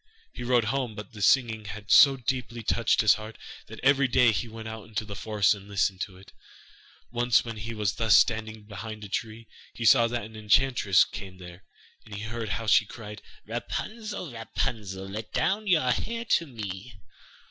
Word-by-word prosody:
He - - -8
rode 120 -1 +2
home, 130 -5 -2
but 105 -1 -9
the 105 - -9
singing 110 -1 +3
had 105 -1 -7
so 135 +9 +8
deeply 120 -2 -3
touched 115 +1 +2
his 110 -4 +6
heart, 110 +2 -8 0.3
that - - -10
every 140 0 +4
day 125 -1 +4
he 115 +3 -2
went 110 0 -9
out 110 0 -8
into 110 0 -4
the 100 -1 -7
forest 105 0 +2
and 100 -1 -11
listened 95 -1 0
to 95 -2 -5
it. 100 +3 -16 0.8
Once 120 0 +2
when 115 -2 -6
he 110 +2 -6
was 105 -2 0
thus 115 -2 +3
standing 110 -1 +2
behind 105 +1 -8
a 100 - -8
tree, 115 +3 -4 0.3
he 115 - -4
saw 115 +1 +6
that 120 -1 -3
an 110 0 -12
enchantress 110 -2 +3
came 95 -2 -9
there, 90 0 -12 0.4
and 105 -2 -10
he 100 - -6
heard 115 -1 -5
how 115 - -3
she 110 0 +4
cried: 105 -2 -9 0.2
'Rapunzel, 215 - -5
Rapunzel, 110 -4 -4
Let 105 +3 -7
down 210 +2 0
your 155 -9 +3
hair 230 - -3
to 170 -7 +2
me. 105 -3 -8
110 Hz, 190 wpm, -27 LUFS, 105-120 Hz, 0.8 s, so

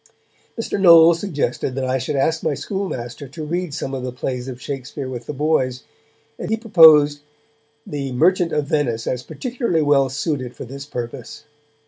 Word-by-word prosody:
Mr. 225 - -2
Knowles 170 -2 +7
suggested 140 -8 -2
that 135 -1 -2
I 130 +1 0
should 130 +4 -3
ask 160 +4 +1
my 155 -3 -1
schoolmaster 140 - -5
to 155 +4 -8
read 175 +1 -3
some 140 -2 -4
of 130 - -3
the 125 0 -4
plays 125 0 -4
of 125 -2 -7
Shakespeare 135 0 -6
with 125 -2 -7
the - - -3
boys, 130 -4 0 0.6
and - - -5
he 220 - +1
proposed 160 -9 +6 0.7
The 140 -2 -4
Merchant 170 +6 +2
of 150 -1 0
Venice 130 -7 -1
as 125 - -2
particularly 235 - -2
well 140 -2 +3
suited 130 -2 -3
for - - -8
this 135 +3 -9
purpose. 120 0 -7
145 Hz, 170 wpm, -20 LUFS, 130-160 Hz, 0.7 s, Knowles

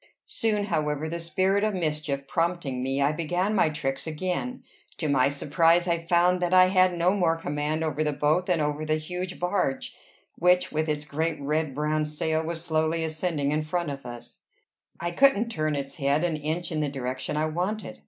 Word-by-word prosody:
Soon, 215 -3 0
however, 150 -5 -1
the 170 +2 -4
spirit 190 +4 +1
of 215 -2 +1
mischief 150 -5 -2
prompting 165 -7 -1
me, 135 +2 0
I 140 - +3
began 175 +6 -1
my 190 -6 +3
tricks 135 -1 -3
again: 185 +10 -3 0.3
to 155 - -2
my 140 -2 +3
surprise 165 +5 +2
I 170 -1 +1
found 180 +1 +3
that 180 +1 +2
I 185 0 +7
had 185 -1 +4
no 175 +3 +3
more 170 -4 +2
command 150 0 -2
over 155 -1 -1
the 150 - 0
boat 150 +5 +1
than 180 -3 +2
over 150 +1 -1
the 155 0 +1
huge 180 +3 -5
barge, 180 -7 -1 0.4
which, 180 +1 +3
with 155 +1 -1
its 150 0 -1
great 155 +2 -2
red 150 0 -1
brown 150 +1 0
sail, 155 +1 -1
was 165 +1 -4
slowly 160 0 +1
ascending 155 -2 -1
in 155 +1 +1
front 155 0 -2
of 135 -2 -7
us; 120 -1 -10 0.6
I 175 0 -2
couldn't 235 +1 +4
turn 155 -7 -1
its 140 -1 -5
head 140 +3 +1
an 170 -3 0
inch 160 +4 -3
in 155 - -1
the 150 - 0
direction 130 +1 -3
I 155 - +1
wanted. 180 - -3
160 Hz, 195 wpm, -26 LUFS, 150-180 Hz, 0.6 s, I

